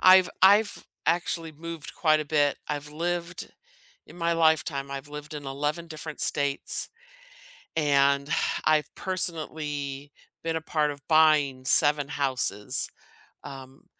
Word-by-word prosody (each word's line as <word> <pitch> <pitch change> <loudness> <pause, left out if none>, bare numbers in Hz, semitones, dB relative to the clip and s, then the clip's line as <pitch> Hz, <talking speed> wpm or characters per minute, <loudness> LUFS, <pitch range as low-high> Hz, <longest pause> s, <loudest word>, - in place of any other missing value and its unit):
I've 185 -1 +7
I've 205 +3 +5 0.2
actually 165 -1 0
moved 165 0 -8
quite 155 -2 +3
a - - -3
bit. 145 -1 +2
I've 150 0 -4
lived, 170 +2 -3 0.5
in - - -14
my 170 0 +1
lifetime, 160 -4 +2
I've 140 +1 -6
lived 150 +1 -8
in 145 -2 -7
11 150 +5 -2
different 155 -1 -7
states, 140 -1 -1 0.9
and 140 -2 +3 0.4
I've 155 -2 +2
personally 150 -6 -3 0.3
been 165 0 -1
a 160 - -2
part 150 -2 0
of 140 0 -12
buying 150 -5 +4
7 145 +1 +3
houses. 130 -8 -1 0.5
Um, 135 +1 -11
150 Hz, 125 wpm, -27 LUFS, 140-165 Hz, 0.9 s, I've